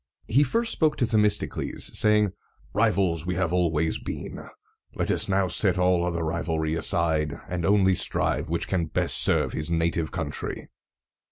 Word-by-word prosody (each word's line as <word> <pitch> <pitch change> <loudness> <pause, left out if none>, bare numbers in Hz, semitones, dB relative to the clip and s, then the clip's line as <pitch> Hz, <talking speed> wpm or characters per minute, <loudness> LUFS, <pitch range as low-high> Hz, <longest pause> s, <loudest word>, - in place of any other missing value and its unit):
He 135 +6 +3
first 230 - +1
spoke 155 -2 +1
to 125 - +2
Themistocles, 105 -2 0
saying, 105 -2 +3 0.4
"Rivals 95 -7 +1
we 90 - -1
have 90 -2 -1
always 80 -3 +1
been; - - -7 0.5
let - - -1
us - - 0
now 95 -1 +2
set 90 +2 +2
all 90 -1 +2
other 85 -1 -2
rivalry 80 -1 -2
aside, 80 -3 +1
and 90 -1 -4
only 95 -2 +4
strive 85 - 0
which 85 0 -2
can 85 -4 -1
best - - 0
serve - - +3
his 75 +1 -2
native 85 -1 -1
country." - - -4
90 Hz, 155 wpm, -25 LUFS, 80-105 Hz, 0.5 s, only